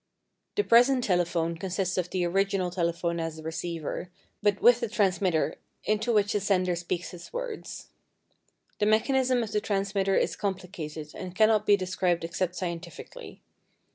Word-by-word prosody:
The 415 - +2
present 250 - +5
telephone 170 -3 +1
consists 185 +1 -2
of 180 -1 -1
the 180 -2 0
original 195 0 +1
telephone 170 -1 -1
as 165 -1 -3
a 160 - -9
receiver, 165 +1 -4 0.3
but 205 -1 +2
with 240 0 +6
a 235 - 0
transmitter 190 -6 +1 0.3
into 215 +3 +1
which 205 -2 +2
the 205 - +2
sender 185 -3 +1
speaks 175 +1 -3
his 175 -1 -11
words. - - -6 0.9
The 210 - +2
mechanism 255 +3 +3
of 215 - -6
the 210 - 0
transmitter 195 -1 0
is - - +1
complicated 175 -6 -5
and 185 -1 -7
cannot 215 0 +4
be 205 - +6
described 180 -2 0
except 170 +2 -2
scientifically. 170 -2 -7
185 Hz, 150 wpm, -28 LUFS, 175-210 Hz, 0.9 s, with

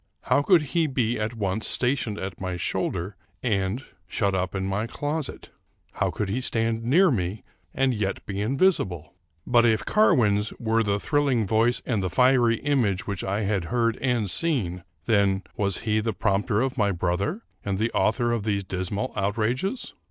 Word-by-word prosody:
How - - +3
could 170 +1 +4
he 165 -2 +3
be 120 -4 0
at 110 +2 -2
once 105 0 -2
sta 125 +1 +1
tioned 110 -6 -4
at 95 -1 -6
my 90 -2 -3
shoulder 95 +1 -2 0.3
and 105 +1 -1 0.2
shut 100 +1 0
up 95 -1 -1
in 95 0 -1
my 100 +4 -1
closet? 145 +3 -4 0.4
How - - 0
could 105 - -3
he 110 +7 -1
stand 115 -2 0
near 165 +9 +4
me 95 -2 -2 0.3
and 135 +3 +1
yet 105 -3 -2
be 100 0 -3
invisible? 110 - +1 0.3
But 120 -1 +4
if 110 -2 +2
Car 215 0 +4
win's 105 -3 +1
were 115 -1 +1
the 100 -2 0
thrilling 140 -4 +1
voice 115 +4 +2
and 110 -5 0
the 95 - -1
fiery 125 +2 +4
image 120 -10 +1
which 100 -3 -4
I 100 +3 -1
had 100 -4 0
heard 115 +5 +1
and 125 -5 0
seen, 95 - -1 0.2
then 100 -3 +2
was 100 -3 0
he 110 -1 +1
the 110 +1 -1
prompter 100 +4 +1
of 130 -1 -1
my 105 -1 +3
brother, 95 - -1 0.2
and 100 -1 -1
the 110 +3 0
author 120 +2 +1
of 115 -2 0
these 100 -1 -1
dismal 95 +2 -3
outrages. 120 - -1
110 Hz, 180 wpm, -25 LUFS, 100-125 Hz, 0.4 s, could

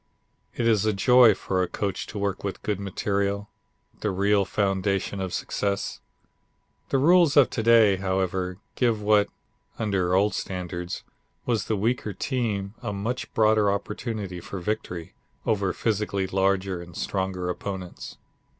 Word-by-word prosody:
It 115 - 0
is 110 -3 +4
a 110 0 +2
joy 120 +1 +6
for 95 -1 -1
a 90 - +1
coach 100 +1 -3
to 110 - -7
work 100 -1 -2
with 100 -1 -4
good 105 -2 -1
material 100 +1 -1 0.5
the 105 - -1
real 100 +1 +2
foundation 95 0 0
of 95 -1 -3
success. 100 +2 -2 0.9
The - - +2
rules 165 +1 +5
of 140 - +6
to - - -1
day, 110 -3 +6
however, 95 -1 -1 0.2
give 115 -4 +2
what, 105 -1 +3 0.5
under 95 -5 +1
old 100 +2 +3
standards, 90 -1 -4 0.4
was 115 -4 0
the 110 - 0
weaker 110 0 0
team 105 -4 -2
a 115 -4 -3
much 110 +6 -3
broader 110 -2 +4
opportunity 100 -2 -4
for 100 - -7
victory 90 -3 -4 0.3
over 100 -3 +1
physically 105 -3 -1
larger 95 -1 0
and 85 -1 -11
stronger 95 -2 -2
opponents. 90 +1 -5
100 Hz, 140 wpm, -26 LUFS, 95-110 Hz, 0.9 s, joy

